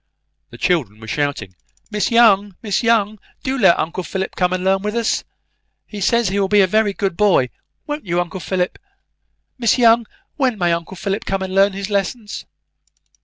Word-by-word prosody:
The - - -12
children 135 - 0
were 110 - -10
shouting, 140 -9 -2 0.4
"Miss 210 -1 0
Young, 205 -5 +4
Miss 205 -3 0
Young, 215 -3 +2 0.2
do 265 0 -1
let 195 -9 +5
uncle 170 +3 -2
Philip 190 +1 -4
come 180 -1 +1
and 185 0 -2
learn 190 0 +2
with 210 +2 -3
us. 235 -1 0 0.6
He 205 -2 -8
says 235 +1 +2
he 200 +1 -1
will 195 - +2
be 205 +1 +4
a - - +5
very 215 +2 +2
good 195 -2 -2
boy, 190 -12 +3 0.3
won't 295 0 -4
you, 175 +1 0
uncle 175 +1 -3
Philip? 180 0 -2 0.8
Miss 235 0 +3
Young, 230 -2 +4 0.3
when 260 -6 +1
may 175 -3 +1
uncle 170 +3 -5
Philip 195 +3 -3
come 195 0 -2
and 185 0 -5
learn 195 +1 +4
his 195 +1 -5
lessons?" 205 +2 -3
195 Hz, 185 wpm, -19 LUFS, 180-215 Hz, 0.8 s, let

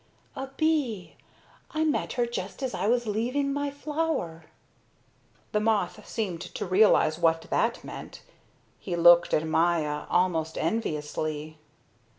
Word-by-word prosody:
"A 270 - -4
bee. 290 - 0 0.5
I 315 -1 -1
met 310 -1 0
her 245 -2 +1
just 205 0 -5
as 260 - -2
I - - -1
was 240 +1 +2
leaving 250 +7 -1
my 285 0 -1
flower." 285 - -3 1.1
The 210 - +1
moth 210 -5 0
seemed 190 -7 -3
to 180 - -5
realize 185 -4 +4
what 165 -1 +2
that - - +1
meant. - - -9 0.6
He 180 - -4
looked 175 0 +6
at 155 - +2
Maya 160 -2 +1
almost 165 -3 +1
enviously. 155 -4 -3
190 Hz, 130 wpm, -27 LUFS, 165-250 Hz, 1.1 s, looked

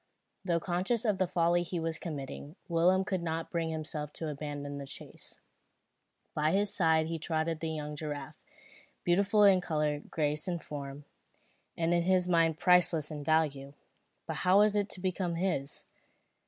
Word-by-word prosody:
Though 170 -3 +1
conscious 190 +8 -1
of 205 -4 +1
the 185 - +2
folly 170 0 +2
he 175 0 -3
was 165 -1 -2
committing, 145 -1 -6
Willem 180 +2 +3
could 190 -2 -1
not 165 -1 -3
bring 165 -1 -1
himself 155 -2 -4
to 160 - -4
abandon 145 -1 -5
the 140 - -7
chase. 140 - -10 1.0
By 155 +1 +1
his 200 +1 +2
side 160 -3 +3
trotted 160 0 -1
the 160 - -3
young 150 -1 -4
giraffe, 145 -1 -6 0.6
beautiful 200 +4 +3
in 195 -2 +6
colour, 150 -3 0
graceful 150 +3 -1
in 170 - -3
form, 140 -2 -7 0.7
and 165 0 +1
to 175 0 +3
his 180 0 +2
mind 165 -3 +3
priceless 175 -4 +3
in 150 -1 -5
value. 145 -3 0 0.5
But - - -4
how 185 +2 +4
was 210 0 +4
it 205 0 +1
to - - -4
become 180 -2 -1
his? 165 -6 -1
165 Hz, 160 wpm, -31 LUFS, 150-180 Hz, 1.0 s, in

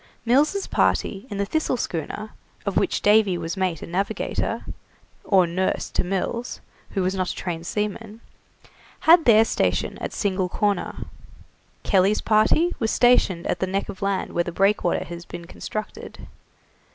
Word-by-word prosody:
Mills' 300 +11 +2
party 200 +4 0
in 205 - -5
the 200 - 0
'Thistle' 310 +2 -1
schooner, 210 +3 -4 0.3
of 200 - -2
which - - 0
Davy 205 -3 +4
was 165 +1 -4
mate 185 -4 -1
and - - -9
navigator, 195 +3 -2 0.6
or 190 -3 +4
nurse 180 +2 -1
to - - 0
Mills, 195 +6 -3 0.3
who 195 - -1
was 185 +1 0
not 185 -2 -1
a - - -4
trained 170 -2 -5
seaman, 210 +1 -3 0.8
had 330 0 +6
their 225 -1 +6
station - - -1
at - - -4
Single 190 -3 -1
Corner; 205 -1 -1 0.8
Kelly's 195 +1 +3
party 225 +11 +3
was 225 - 0
stationed 210 -9 +3
at - - -1
the 190 - 0
neck 195 +2 -2
of 190 - -8
land 195 -1 -1
where 175 - +1
the 175 - -5
breakwater 195 0 +1
has 170 0 -8
been 175 -1 -9
constructed. 215 +4 -7
195 Hz, 155 wpm, -23 LUFS, 180-220 Hz, 0.8 s, had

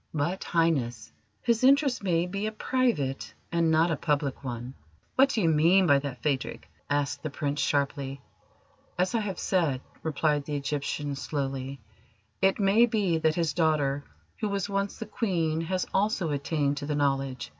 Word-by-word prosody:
"But, 170 +6 -1
Highness, 135 -10 0 0.3
his 235 0 +1
interest 275 0 +4
may 175 -3 +2
be 200 +4 -3
a - - -2
private 220 - -1 0.2
and 170 -1 +2
not 160 +2 +3
a - - +2
public 145 -2 -1
one." 120 0 -5 0.4
"What 270 +1 +5
do 225 - 0
you - - +3
mean 170 +5 +5
by 140 -4 +5
that, 135 -3 -6
Phadrig?" 140 -3 -2 0.2
asked 145 -1 0
the 155 - -3
Prince 145 0 -2
sharply. 140 -1 -1 0.8
"As 180 +1 +1
I 230 - +2
have 200 -4 -3
said," 165 -9 +1 0.2
replied 150 -2 0
the 150 - -3
Egyptian 145 0 -2
slowly, 135 -2 -4 0.6
"it 195 +2 +3
may 210 +4 +5
be 200 -7 +1
that 160 -1 +2
his 165 -3 0
daughter, 145 -4 +1 0.4
who 215 - -1
was 200 -1 -1
once 200 0 -2
the 225 - -5
Queen, 170 -7 -1
has 185 +2 -1
also 195 -5 +1
attained 145 0 0
to 145 - -4
the 150 - -1
Knowledge. 135 -3 -1
155 Hz, 165 wpm, -28 LUFS, 140-190 Hz, 0.8 s, What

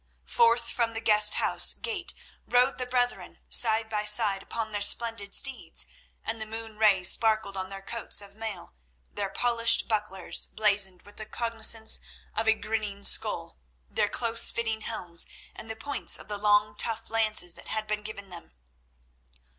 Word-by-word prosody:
Forth 235 0 +2
from 230 -1 -2
the 225 - -4
guest 210 -1 +5
house - - +3
gate 405 -7 -4 0.3
rode 250 +1 +2
the 250 - -4
brethren, 245 -1 -2
side 225 -1 +3
by 210 -1 -3
side 210 -2 +3
upon 220 +1 -6
their 205 -1 -4
splendid 205 -1 +2
steeds, 270 -1 -2 0.4
and 225 0 -2
the 220 - -4
moon 225 -1 -6
rays 195 -4 +4
sparkled 220 -3 0
on 190 0 -5
their 195 0 -9
coats 230 +2 -2
of 200 -1 -10
mail, 220 - -8 0.4
their 200 -1 -4
polished 230 +1 +2
bucklers, 210 -4 0
blazoned 200 -4 +1
with 205 - -17
the 215 - -8
cognizance 225 -1 +2 0.4
of 225 - 0
a 220 - +5
grinning 215 -2 -5
skull, 65 - -1 0.3
their - - 0
close 230 -1 +3
fitting 225 -1 -3
helms, 175 -7 -1 0.3
and 220 - -10
the 225 - -4
points 285 +6 0
of - - -13
the 205 -1 -5
long, 210 0 +2
tough 225 0 0
lances 215 -6 +2
that - - -12
had 220 0 -3
been 210 0 -3
given 200 -2 -9
them. 170 - -11
220 Hz, 165 wpm, -27 LUFS, 205-230 Hz, 0.4 s, guest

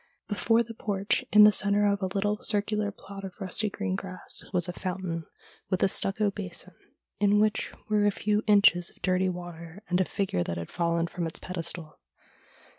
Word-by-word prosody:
Before 225 +2 +2
the 230 0 -9
porch 205 +1 -1
in 210 0 +9
the 210 - +9
centre 205 0 +2
of 200 0 +1
a 190 - 0
little 205 +2 -1
circular 210 0 0
plot 200 0 -10
of 190 +1 -8
rusty 205 +2 -1
green 200 -2 -2
grass 185 -1 -3
was 180 -2 +1
a 180 - -4
fountain 180 -3 -4 0.4
with 185 -2 +1
a - - +6
stucco 200 +2 +1
basin, 185 -2 -6 0.5
in 205 0 +4
which 215 0 +1 0.2
were 210 -1 +3
a - - +4
few 210 +1 0
inches 200 -4 +5
of - - -24
dirty 185 0 +2
water, 175 +1 -8
and 180 +1 +3
a - - +2
figure 185 - -1
that 85 0 -4
had 85 - -6
fallen 170 -1 +1
from 170 0 -3
its 160 - -5
pedestal. 170 -3 -5
195 Hz, 190 wpm, -28 LUFS, 175-205 Hz, 0.5 s, in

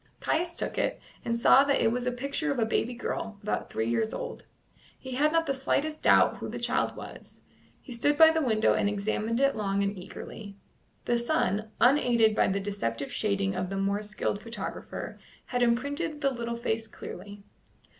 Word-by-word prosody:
Caius 345 +2 0
took - - -3
it, - - 0 0.2
and 235 0 -1
saw 260 +3 +7
that 280 0 +2
it 225 - +3
was 250 +1 -2
a - - +2
picture 280 +5 -2
of 280 - -2
a 230 - +2
baby 230 +2 -1
girl, 225 -3 -4
about 210 - -2
three 110 +1 -2
years 220 - 0
old. - - -6 0.5
He 260 - -9
had 290 +4 +2
not 330 0 +2
the 275 - 0
slightest 290 +3 -1
doubt - - +5
who - - -6
the - - -5
child - - 0
was; - - -11 0.4
he 270 - -13
stood 290 +5 +1
by 320 0 +9
the 320 0 +1
window 220 -5 +3
and 205 - +1
examined 215 +3 -1
it 275 0 +3
long 200 -1 0
and 200 +1 -1
eagerly. 200 +2 -9 0.5
The 240 0 +2
sun, 220 -5 0
unaided 240 -4 +4
by - - +3
the 195 +1 0
deceptive 195 - -3
shading 200 -2 0
of 185 -1 -2
the 195 - -3
more 200 +1 0
skilled 210 -1 -3
photographer, 230 +2 -6 0.3
had 245 -1 -2
imprinted 285 +6 0
the 275 -2 +2
little 235 -2 -4
face 225 -1 -2
clearly. 205 -1 -9
235 Hz, 190 wpm, -28 LUFS, 205-275 Hz, 0.5 s, by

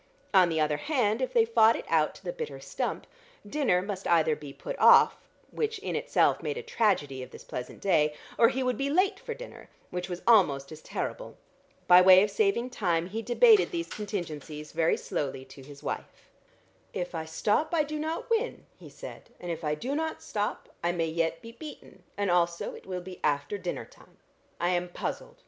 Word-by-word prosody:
On 185 -3 +6
the 160 -1 0
other 150 -1 +1
hand, 245 - 0
if 260 - -1
they 460 -2 +4
fought 230 - +5
it - - -6
out 155 -2 +2
to - - -15
the - - -4
bitter 475 -2 -6
stump, - - -4 0.4
dinner 205 -8 +1
must 200 -1 -5
either 160 -2 +3
be 150 -2 -9
put - - -6
off, - - +7 0.4
which 450 0 -2
in - - -4
itself - - +2
made 450 - -3
a 470 - -5
tragedy 190 - 0
of 130 - -8
this - - -12
pleasant 125 0 -7
day, 150 -6 +2 0.2
or 230 - +5
he 265 0 -2
would 250 -3 -1
be 275 +1 0
late 380 +6 +2
for 465 - -6
dinner, - - -11 0.2
which 180 +1 -4
was 175 0 -5
almost 150 -12 +4
as 155 0 -10
terrible. - - -5 0.5
By 180 0 +8
way 185 +1 +8
of 210 - -1
saving 395 - +1
time 175 -6 0
he 220 +4 -3
debated 420 - +5
these 340 -3 -4
contingencies 160 -7 -6
very 165 0 +2
slowly 135 -2 -4
to 135 +1 -13
his 140 +1 -13
wife. - - -6 0.6
"If 180 0 -3
I 160 -1 -3
stop 210 - 0
I 330 -3 +3
do 305 +1 -5
not 315 +2 -3
win," 460 +2 0
he - - -12
said, - - -10
"and 175 - -5
if 165 -1 -5
I 150 0 0
do 255 - -4
not 320 +2 -3
stop, 205 0 -3 0.2
I 175 - +2
may 165 -2 -1
yet 165 0 -1
be 230 - -9
beaten, 295 +6 -11 0.2
and 200 -2 0
also 170 -1 +1
it - - -12
will 180 -1 -4
be 185 0 -10
after 145 +5 0
dinner 180 -1 -4
time. - - -21 0.4
I 175 - +1
am 180 0 0
puzzled. - - -5
185 Hz, 205 wpm, -28 LUFS, -, 0.6 s, By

